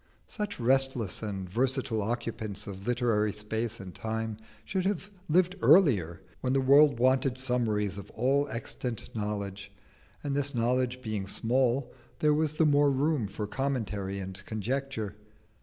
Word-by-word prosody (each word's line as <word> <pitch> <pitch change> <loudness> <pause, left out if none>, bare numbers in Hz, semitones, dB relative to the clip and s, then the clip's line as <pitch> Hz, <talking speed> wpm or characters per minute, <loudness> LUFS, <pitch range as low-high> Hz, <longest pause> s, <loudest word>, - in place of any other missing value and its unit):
Such 210 - -4
restless 130 -4 +2
and 100 -4 -4
versatile 125 +2 0
occupants 110 -2 -3
of 95 +1 -8
literary 115 -4 +2
space 110 +2 -3
and 95 -2 -8
time 110 -1 -3 0.3
should 190 -3 -1
have 195 +1 -2 0.2
lived 180 +3 +3
earlier 95 - +4 0.2
when 130 0 0
the 135 - +3
world 140 +1 +6
wanted 130 +1 +2
summaries 110 -6 0
of 100 - -10
all 135 +5 +2
extant 115 0 -5
knowledge, 100 -2 -4 0.5
and 140 -2 -1
this 140 -1 +1
knowledge 125 +2 0
being 105 -4 -3
small, 125 +4 +1 0.2
there 150 -1 +3
was 155 0 +1
the 160 - +3
more 145 -1 +5
room 140 -3 +1
for 105 +2 -4
commentary 105 -6 -2
and 95 0 -6
conjecture. 110 -1 -3
120 Hz, 140 wpm, -29 LUFS, 105-135 Hz, 0.5 s, world